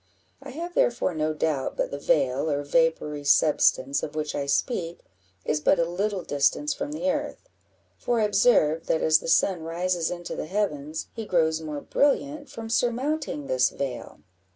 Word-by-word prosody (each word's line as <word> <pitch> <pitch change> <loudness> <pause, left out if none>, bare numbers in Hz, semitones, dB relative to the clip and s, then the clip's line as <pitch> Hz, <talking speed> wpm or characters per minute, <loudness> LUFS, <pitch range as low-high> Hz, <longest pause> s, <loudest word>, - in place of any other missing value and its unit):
I - - -10
have 340 +5 -6
therefore 240 - +1
no 155 -1 -1
doubt 150 -4 -1
but - - -1
the 140 - -5
veil, 140 0 +1
or 145 -1 -1
vapoury 150 -1 +1
substance, 140 -2 +3
of 150 - -6
which 155 -1 -2
I 140 - -3
speak, 170 - -1 0.4
is 150 0 0
but 185 - +4
a 170 - +2
little 190 +2 -2
distance 155 - +1
from 285 +1 -5
the 280 -2 0
earth; 295 - -5 0.5
for 240 -1 0
I - - +2
observe, 165 -7 +3
that 160 - +1
as 160 0 +5
the - - -8
sun 175 +1 +2
rises 170 +1 -1
into 175 -1 -5
the - - -5
heavens, 160 -6 -3
he 225 -2 -6
grows 160 -3 +1
more 150 -2 -5
brilliant 285 0 0
from 230 -4 -7
surmounting 245 - -1
this 130 -1 +2
veil." 135 -3 -6
165 Hz, 175 wpm, -26 LUFS, 150-230 Hz, 0.5 s, as